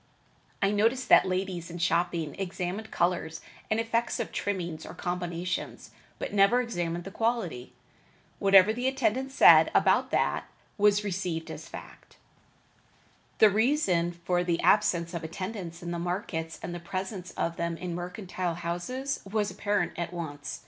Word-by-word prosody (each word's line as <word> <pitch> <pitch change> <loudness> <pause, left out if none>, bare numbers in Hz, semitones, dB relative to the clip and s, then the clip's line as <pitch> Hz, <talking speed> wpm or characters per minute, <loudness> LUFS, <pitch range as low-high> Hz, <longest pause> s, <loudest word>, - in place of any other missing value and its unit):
I 195 - +3
noticed 230 +5 +1
that - - +7
ladies 185 -2 -2
in 170 - -7
shopping 170 -2 0
examined 190 +3 -4
colors 170 -2 -1 0.3
and 220 - +1
effects 230 +1 0
of 235 - -3
trimmings 175 -5 -3
or 160 - -9
combinations, 175 0 -4 0.3
but - - -5
never 205 +5 +5
examined 175 -8 -2
the 195 - -8
quality. 220 - -2 0.7
Whatever 195 +1 +6
the 245 +3 -1
attendant 265 0 0
said 275 - +7
about - - +4
that - - 0 0.3
was 205 0 +3
received 180 -4 -3
as - - -8
a - - -16
fact. - - -12 1.2
The 215 -2 +7
reason 200 - +2
for 175 +1 -1
the 170 -1 0
absence 175 -5 +3
of 170 -1 -4
attendants 175 0 -6
in 170 - -4
the 170 - -3
markets 175 -2 -3
and 175 - -4
the 175 - -5
presence 185 +1 -5
of 170 - -2
them 170 0 -2
in 180 0 -5
mercantile 180 0 -4
houses 175 +12 -3
was 210 -1 0
apparent 205 -4 0
at 170 0 -3
once. 150 -5 -6
180 Hz, 150 wpm, -28 LUFS, 170-210 Hz, 1.2 s, that